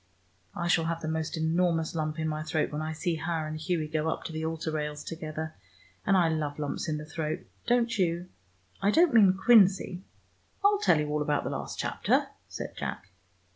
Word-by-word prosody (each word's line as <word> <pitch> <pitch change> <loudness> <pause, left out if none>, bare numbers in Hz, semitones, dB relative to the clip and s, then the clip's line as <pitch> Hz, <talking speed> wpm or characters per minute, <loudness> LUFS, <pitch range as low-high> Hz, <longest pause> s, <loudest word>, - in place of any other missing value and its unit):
I 175 -1 -2
shall 165 -2 +3
have 165 0 -2
the 155 - -4
most 160 +1 -2
enormous 165 0 +1
lump 155 -1 -2
in 160 0 -1
my 155 0 -2
throat 155 0 -1
when 150 +1 -3
I 155 0 -3
see 165 +1 -1
her 160 0 -2
and 155 0 -4
Hughie 160 -1 -1
go 155 +1 -1
up - - -3
to - - -5
the 160 0 -3
altar 160 0 -2
rails 150 -1 -3
together, 160 -1 -5 0.5
and 195 - +5
I 175 -2 +4
love 155 -3 -1
lumps 150 +2 -3
in 155 - 0
the 150 - -6
throat. 155 0 -3 0.3
Don't 235 -1 +2
you? 175 0 +1 0.5
I 200 - +3
don't 325 +7 +4
mean 195 -5 +6
quinzy." 195 -4 +5 0.6
"I'll 410 0 +5
tell 165 - +4
you 150 - -1
all 150 0 0
about 150 0 +1
the - - -3
last - - -5
chapter," - - +1 0.2
said - - -6
Jack. 95 - -5
160 Hz, 205 wpm, -29 LUFS, 155-175 Hz, 0.6 s, mean